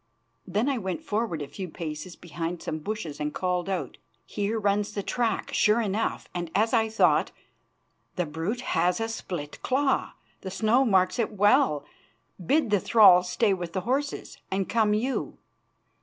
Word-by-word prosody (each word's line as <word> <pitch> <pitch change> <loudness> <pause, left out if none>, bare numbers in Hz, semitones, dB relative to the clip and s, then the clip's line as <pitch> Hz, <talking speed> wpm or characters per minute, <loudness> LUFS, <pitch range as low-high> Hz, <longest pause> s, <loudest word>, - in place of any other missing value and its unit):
Then 210 +7 0
I 275 -3 0
went 190 - -4
forward 210 - -2
a - - -7
few 185 +6 -7
paces 155 +2 -6
behind 170 0 -5
some 155 - -3
bushes 170 -4 -5
and 150 0 -3
called 180 0 -1
out: 190 -2 -3 0.3
"Here 210 +2 -2
runs 205 0 0
the 200 - -2
track, 230 -2 -1
sure 215 +2 +3
enough, 215 0 -1
and, 175 -2 -4
as 220 +4 +2
I 225 -2 +3
thought, 220 - +3 0.9
the 180 - 0
brute 165 +11 -3
has 180 -5 +1
a 225 - -1
split 175 -9 -6
claw; 270 +1 +1 0.3
the 190 - -5
snow 220 +7 +2
marks 185 -2 +2
it 225 - 0
well. 195 -7 +3 0.6
Bid 275 - +2
the 205 - +4
thrall 200 -4 +7
stay 195 +4 +1
with 175 -3 -5
the 185 - -1
horses 275 +7 -3
and 190 0 -1
come 215 -2 +2
you." 250 +5 -2
200 Hz, 165 wpm, -27 LUFS, 175-225 Hz, 0.9 s, thrall